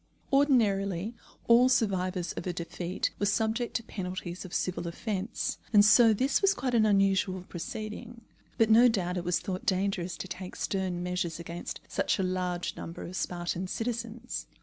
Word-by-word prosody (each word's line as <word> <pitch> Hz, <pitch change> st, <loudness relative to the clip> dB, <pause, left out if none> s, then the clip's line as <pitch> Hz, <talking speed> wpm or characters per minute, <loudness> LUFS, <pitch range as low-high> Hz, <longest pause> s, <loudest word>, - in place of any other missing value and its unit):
Ordinarily 210 Hz, -, +2 dB, 0.3 s
all 240 Hz, +2 st, +6 dB
survivors 185 Hz, -7 st, 0 dB
of -, -, -5 dB
a 180 Hz, -, -1 dB
defeat 175 Hz, +1 st, -3 dB
were 205 Hz, -, +1 dB
subject 220 Hz, +4 st, 0 dB
to 230 Hz, -, 0 dB
penalties 185 Hz, -3 st, -5 dB
of 185 Hz, -, -9 dB
civil 175 Hz, -1 st, -2 dB
offence, 200 Hz, +4 st, -3 dB
and 205 Hz, -2 st, +7 dB
so 225 Hz, +1 st, +7 dB
this 260 Hz, +6 st, +2 dB
was 395 Hz, 0 st, +4 dB
quite 255 Hz, -2 st, -2 dB
an 220 Hz, -2 st, +4 dB
unusual 195 Hz, -2 st, +2 dB
proceeding; 215 Hz, +6 st, -7 dB, 0.4 s
but 225 Hz, -2 st, +4 dB
no 235 Hz, +3 st, +8 dB
doubt 185 Hz, -6 st, 0 dB
it 175 Hz, -, -2 dB
was 175 Hz, 0 st, +1 dB
thought 190 Hz, -3 st, -4 dB
dangerous 185 Hz, -2 st, 0 dB
to -, -, -6 dB
take 185 Hz, 0 st, -7 dB
stern 185 Hz, -3 st, -2 dB
measures 180 Hz, -2 st, -2 dB
against 170 Hz, +1 st, -6 dB
such -, -, 0 dB
a 190 Hz, -, 0 dB
large 180 Hz, -1 st, -2 dB
number 165 Hz, -, -7 dB
of 180 Hz, -, -7 dB
Spartan 175 Hz, 0 st, -2 dB
citizens. 235 Hz, +3 st, -4 dB
195 Hz, 165 wpm, -29 LUFS, 180-225 Hz, 0.4 s, no